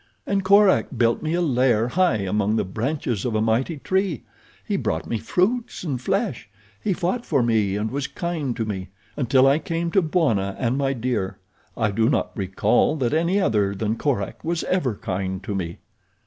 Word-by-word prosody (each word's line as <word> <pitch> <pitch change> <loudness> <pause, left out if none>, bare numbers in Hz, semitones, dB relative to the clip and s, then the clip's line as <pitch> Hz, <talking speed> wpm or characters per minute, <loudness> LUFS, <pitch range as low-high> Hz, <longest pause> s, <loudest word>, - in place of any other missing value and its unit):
"And 200 -1 0
Korak 200 +1 +5
built 115 0 +2
me 160 +1 -1
a 175 - +1
lair 125 -6 +2
high 180 -2 +2
among 105 +2 0
the 110 - 0
branches 115 +1 -2
of 120 -3 -1
a - - +2
mighty 115 +9 +1
tree. 190 - -1 0.4
He - - -1
brought 80 0 -1
me 115 - -2
fruits 225 - 0
and 135 -8 -3
flesh. 195 - -1 0.3
He 210 - +1
fought 185 +7 -1
for 140 - +1
me 110 -4 +1
and 105 +2 -2
was 140 +1 -2
kind 160 -8 -3
to 115 - -2
me—until 110 +7 0
I 140 +3 +4
came 165 +1 -2
to 195 - +4
Bwana 135 - +1
and 125 -1 0
My 135 -1 +1
Dear 120 -6 -2 0.4
I 110 -2 +1
do 110 +3 +2
not - - 0
recall 100 +6 +2
that 130 -3 -1
any 170 +5 +2
other 105 - +1
than 105 +3 -1
Korak 120 -6 -2
was 170 +1 -1
ever 140 - 0
kind 95 0 -3
to 100 - -4
me." 85 -3 -3
125 Hz, 185 wpm, -23 LUFS, 105-165 Hz, 0.4 s, Korak